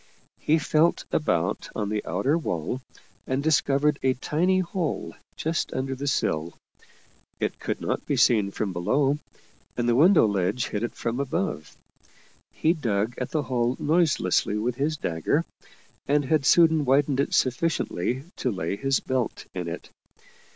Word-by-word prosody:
He 155 - +2
felt 155 +2 +2
about 90 - 0
on 105 -2 -2
the 105 0 -2
outer 100 - +1
wall 125 - -2 0.5
and 130 +2 -1
discovered 150 -1 +2
a 130 -1 +2
tiny 175 +8 +1
hole 180 -3 -2 0.2
just 160 +1 -2
under 135 +1 -2
the 140 +2 -5
sill. 80 - -1 0.8
It - - -2
could - - -3
not - - -2
be - - +1
seen 105 -4 +4
from 100 -1 -3
below, 135 +11 +1 0.6
and 120 - 0
the 120 - +3
window 165 - +6
ledge 100 +3 0
hid 105 - -3
it 120 - -3
from 120 +2 -3
above. 90 - -3 0.7
He 160 - +2
dug 115 - -1
at 125 - -3
the 155 -2 -1
hole 125 -1 0
noiselessly 145 - +2
with 120 +3 -2
his 150 +3 0
dagger, 85 - 0 0.6
and 145 0 +2
had 150 -1 +1
soon 160 -3 +5
widened 135 0 +2
it 140 - +1
sufficiently 130 - 0
to 130 - -1
lay 95 -3 -2
his 135 +2 +1
belt 130 -3 -2
in 90 -2 -4
it. 85 +1 -7
130 Hz, 150 wpm, -25 LUFS, 105-150 Hz, 0.8 s, window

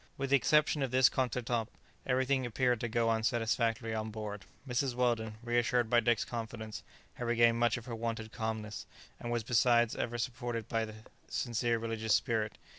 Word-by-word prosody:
With 135 0 -3
the - - +7
exception 150 +1 +3
of 135 - 0
this 130 +1 +5
contretemps, 120 -2 -1 0.4
everything 130 +1 +2
appeared 125 0 +1
to 120 - -2
go 115 0 +1
on 110 0 +2
satisfactorily 115 0 0
on 110 0 -2
board. 105 -2 -6 0.2
Mrs. 130 0 0
Weldon, 115 -3 0
reassured 120 0 +1
by 120 - +6
Dick's 120 -1 +2
confidence, 110 -2 -6 0.3
had 120 - -5
regained 115 0 +4
much 120 0 +3
of 120 - -9
her 120 - -6
wonted 115 -1 -3
calmness, 110 -2 -4 0.3
and 120 - -4
was 120 -1 0
besides 120 0 +3
ever 120 0 -2
supported 120 -1 -3
by 115 -1 0
a 110 -1 -4 0.3
sincere 120 -1 0
religious 110 -1 0
spirit. 110 -2 -1
115 Hz, 175 wpm, -32 LUFS, 110-125 Hz, 0.4 s, the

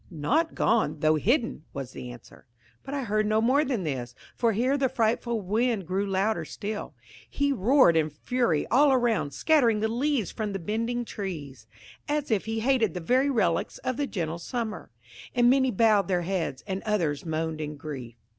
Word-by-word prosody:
"Not 250 - 0
gone, 160 -10 +1
though 155 0 +4
hidden," 230 - 0
was 135 -2 -5
the 125 - -8
answer. 120 -2 -14 0.3
But 275 +2 -6
I 275 - -2
heard 215 -1 0
no 215 +1 +2
more 260 +6 +3
than 255 -9 -2
this, 125 -6 -4 0.2
for 230 -2 +2
here 250 +6 +1
the 270 -2 +1
frightful 235 -2 0
wind 215 +1 0
grew 190 +4 -1
louder 195 +3 0
still. 210 0 -6 0.3
He 285 0 0
roared 240 - +4
in 155 -1 +2
fury 165 - 0
all 280 +3 +5
around, 240 - +2
scattering 235 - +3
the 220 - +1
last 230 +2 -3
leaves 280 - 0
from 215 -3 -4
the - - -1
bending 230 +6 -2
trees, 145 - -6 0.4
as 295 -3 -1
if 210 -4 +1
he 225 0 -2
hated 230 -7 +2
the - - -2
very 255 +11 +2
relics 190 -11 0
of 255 -1 -2
the 285 - -1
gentle 170 -6 -3
summer. 225 +4 -4 0.5
And 240 0 +5
many 260 -1 +3
bowed 210 -4 +3
their 180 -2 0
heads, 170 -7 -2
and 190 -1 -3
others 170 -10 -1
moaned 160 -1 -3
in 150 -1 -5
grief. 135 -6 -7
215 Hz, 185 wpm, -27 LUFS, 165-245 Hz, 0.5 s, all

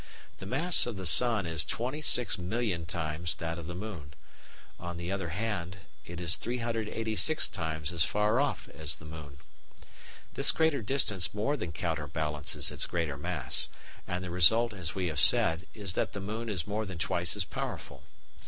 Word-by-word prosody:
The 95 - -8
mass 155 - +5
of 115 -5 -5
the 95 - -6
sun 115 +2 +6
is 80 -2 +2
26,000,000 115 - +1
times 85 -1 -2
that 85 -1 -4
of 80 - -8
the 85 - -6
moon; 90 -8 -7 0.6
on 85 0 -6
the 85 +2 -4
other 95 -4 -3
hand 100 -1 -3 0.3
it 85 0 -7
is 85 -1 0
386 115 +3 0
times 80 -3 -4
as 85 -2 +2
far 105 +5 +1
off 145 - -1
as 80 0 -1
the 80 - -14
moon. 75 -3 -9 1.0
This - - +3
greater 160 -5 +1
distance 105 -6 +1
more 125 +8 0
than 90 - -5
counterbalances 75 -3 -1
its - - +1
greater 85 -5 -2
mass, 75 -2 +1 0.4
and 90 +1 -3
the 90 - -5
result, 110 +7 +5
as 90 -3 -5
we 95 -2 -1
have 80 -4 -2
said, 80 +4 +4
is 100 -4 -3
that - - -1
the 100 - -5
moon 110 +4 -5
is 90 -6 0
more 105 +1 -3
than 95 -2 -7
twice 85 -1 -1
as - - -1
powerful. - - -6
90 Hz, 170 wpm, -30 LUFS, 80-110 Hz, 1.0 s, sun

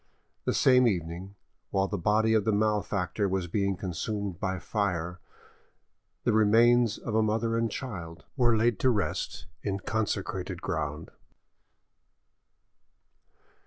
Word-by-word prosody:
The - - +1
same 125 -1 +5
evening, 90 0 -3 0.3
while 95 0 +1
the 100 - -3
body 110 +5 +3
of 110 -2 +3
the 110 - +1
malefactor 105 -2 0
was 95 -1 -1
being 100 +2 0
consumed 95 +1 -3
by 95 -2 -1
fire, 90 -4 -2 1.0
the 120 - +2
remains 115 +2 +4
of 115 - -5
a 110 - +4
mother 115 +1 0
and 115 0 +1
child 85 - -7
were 120 -4 +3
laid 115 -2 +2
to 130 - +3
rest 105 -6 -2 0.2
in 100 -1 -2
consecrated 110 0 -2
ground. 75 +2 -3
105 Hz, 125 wpm, -28 LUFS, 95-110 Hz, 1.0 s, same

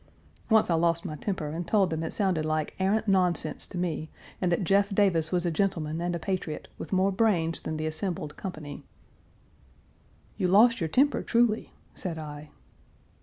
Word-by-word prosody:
Once 220 -1 +5
I - - +4
lost 170 +2 +1
my 155 -4 -4
temper 160 -2 -3
and 165 +3 -4
told 195 -4 +3
them 160 0 -2
it 165 - -3
sounded 185 -6 0
like 155 0 -1
arrant 205 +4 +1
nonsense 180 -5 +1
to 185 - -8
me, 160 -3 -2 0.3
and 180 -2 +1
that 170 - +1
Jeff 200 +3 +3
Davis 190 -6 +2
was 180 -1 0
a 170 - +1
gentleman 165 -3 -1
and 175 0 -1
a - - 0
patriot, 170 -2 -3
with - - -7
more 190 +1 +3
brains 185 -6 +1
than 155 - -4
the 155 - -2
assembled 155 -1 -3
company." 155 -6 -7 1.5
"You 185 - +1
lost 220 +5 +5
your 160 - 0
temper 280 - +3
truly," 235 -2 +1 0.2
said 170 -4 -5
I. 150 -1 -8
175 Hz, 175 wpm, -28 LUFS, 160-195 Hz, 1.5 s, Once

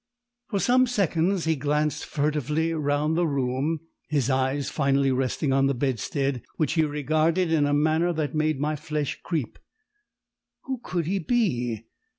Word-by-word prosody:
For 200 - 0
some 255 +4 +4
seconds 190 -5 +1
he 160 0 +2
glanced 150 +2 -1
furtively 150 +2 0
round 150 0 0
the 175 0 +2
room, 140 +3 -1 0.3
his 140 -3 +1
eyes 130 +2 0
finally 140 -2 +2
resting 130 +2 0
on 135 0 +3
the 140 - 0
bedstead, 135 +1 -1 0.2
which 155 -2 +1
he 165 - +3
regarded 155 +4 +1
in 150 -3 +3
a 145 - +1
manner 160 +4 +2
that 155 -2 -2
made 155 -2 +1
my 150 +2 0
flesh 150 -1 -3
creep! 155 -9 -3 1.0
Who 265 -2 -4
could 175 -3 -2
he 195 +4 0
be? 125 - 0
150 Hz, 155 wpm, -25 LUFS, 140-165 Hz, 1.0 s, some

